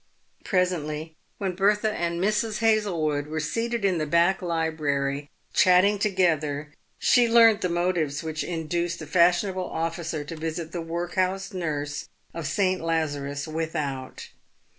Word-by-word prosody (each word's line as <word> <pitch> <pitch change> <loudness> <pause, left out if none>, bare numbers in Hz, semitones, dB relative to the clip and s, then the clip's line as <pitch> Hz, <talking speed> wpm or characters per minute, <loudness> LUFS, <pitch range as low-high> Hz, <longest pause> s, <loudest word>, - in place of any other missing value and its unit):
Presently, 160 -4 -1 0.2
when 190 -2 -2
Bertha 210 +3 +2
and 170 -3 -2
Mrs. 210 +3 0
Hazlewood 175 -10 +1
were 155 +1 -3
seated 230 +8 -1
in 185 -4 +2
the 155 - -1
back 170 +5 +3
library, 150 -4 -1 0.2
chatting 185 +3 +5
together, 155 -7 0 0.2
she 245 -2 +4
learnt 230 -2 +6
the 180 - 0
motives 170 -4 0
which 160 -1 -3
induced 170 0 -2
the 160 - -7
fashionable 180 +3 +2
officer 165 -1 -3
to 155 +3 -7
visit 160 +1 -4
the 175 - -4
workhouse 185 +3 -2
nurse 145 -5 -3 0.2
of 165 -3 -4
St. 185 +1 +1
Lazarus 145 -4 -2
Without. 155 -5 -4
170 Hz, 130 wpm, -26 LUFS, 155-185 Hz, 0.2 s, learnt